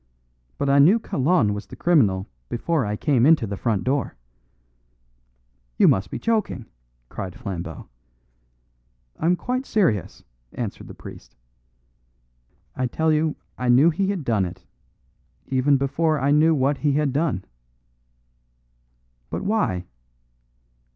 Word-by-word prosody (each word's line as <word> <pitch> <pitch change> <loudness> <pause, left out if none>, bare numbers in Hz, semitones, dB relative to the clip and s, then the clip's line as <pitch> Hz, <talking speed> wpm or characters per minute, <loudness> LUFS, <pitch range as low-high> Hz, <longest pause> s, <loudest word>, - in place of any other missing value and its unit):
But 140 - -1
I 140 +1 +4
knew 175 +11 +6
Kalon 135 - +1
was 100 0 -6
the - - -10
criminal 105 - +2 0.2
before 140 0 -1
I 105 - -1
came 130 0 +1
into 155 -3 +5
the 100 -1 -4
front 105 -2 -1
door." 135 0 -1 1.6
"You - - +5
must 95 +2 +2
be - - -4
joking!" 220 - -1 0.4
cried 90 +6 -7
Flambeau. 90 - -6 1.3
"I'm 175 +3 +2
quite 255 +7 -3
serious," 160 - 0 0.3
answered - - -5
the - - -10
priest. - - -12 1.4
"I 130 - -1
tell 160 +5 +1
you 155 0 +1 0.2
I 125 -1 -1
knew 135 +7 +6
he 195 +4 -1
had 195 -6 -2
done 110 -6 +1
it, 90 +1 -9 0.8
even 135 +2 +2
before 150 +3 0
I 140 +2 +1
knew 155 +2 +4
what 140 +1 +1
he 145 -2 +1
had 145 -2 +1
done." 140 - -1 1.8
"But - - -4
why?" 195 - 0
140 Hz, 130 wpm, -23 LUFS, 110-160 Hz, 1.8 s, knew